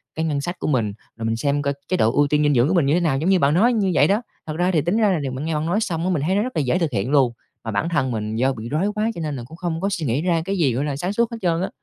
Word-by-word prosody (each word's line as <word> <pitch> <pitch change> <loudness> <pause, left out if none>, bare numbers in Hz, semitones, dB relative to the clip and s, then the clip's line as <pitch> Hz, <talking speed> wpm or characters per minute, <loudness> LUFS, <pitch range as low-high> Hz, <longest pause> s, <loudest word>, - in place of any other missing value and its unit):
cái 160 - -1
ngân 145 -3 -1
sách 175 +5 -5
của - - -3
mình, 115 -8 0 0.2
rồi 115 - -4
mình 115 0 0
xem 145 +3 0
coi 140 0 0
chế 185 - 0
độ 115 -5 +3
ưu 145 +2 +3
tiên 150 +1 +2
dinh 145 0 +3
dưỡng 125 0 +3
của 175 - +1
mình 170 -6 +3
như 140 - +2
thế 175 - +3
nào, 155 -6 +1
giống 160 +7 0
như 190 -1 +4
bạn 140 -1 +3
nói 230 +9 +4
như 200 -4 +1
vậy - - +4
đó. 205 +4 +2 0.3
Thật 155 - -4
ra 180 +2 +2
thì 160 - +2
tính 175 +8 0
ra 215 -3 +3
là 180 - +1
điều 140 -3 -3
mình 130 +4 -5
nghe 165 - -1
bạn 150 0 -1
nói 175 +6 +1
xong 170 -7 -2
á, 185 - 0
mình 165 -6 0
thấy 185 +4 +1
nó 205 - +2
rất 255 +3 -4
là 155 - +2
dễ 140 +7 +1
thực 165 -4 0
hiện 115 +3 -1
luôn, 130 -5 +3 0.3
mà 110 - -4
bản 125 +12 -1
thân 135 -6 0
mình 110 -1 -3
do 130 +3 +1
bị 115 -1 -7
rối 175 +9 0
quá 215 +2 0
cho 170 - -5
nên 150 -3 -3
là 120 - -6
cũng 160 - -12
không 170 -2 -3
có 195 - 0
suy 175 -5 -2
nghĩ 130 +3 0
ra 170 -2 +1
cái 195 0 -2
gì, 140 -9 +2
gọi 135 +5 -1
là, 145 -2 -2
sáng 180 +7 -3
suốt 235 +2 +1
hết 230 - -5
trơn 170 -1 +1
á. 190 - -1
155 Hz, 380 wpm, -22 LUFS, 135-180 Hz, 0.3 s, như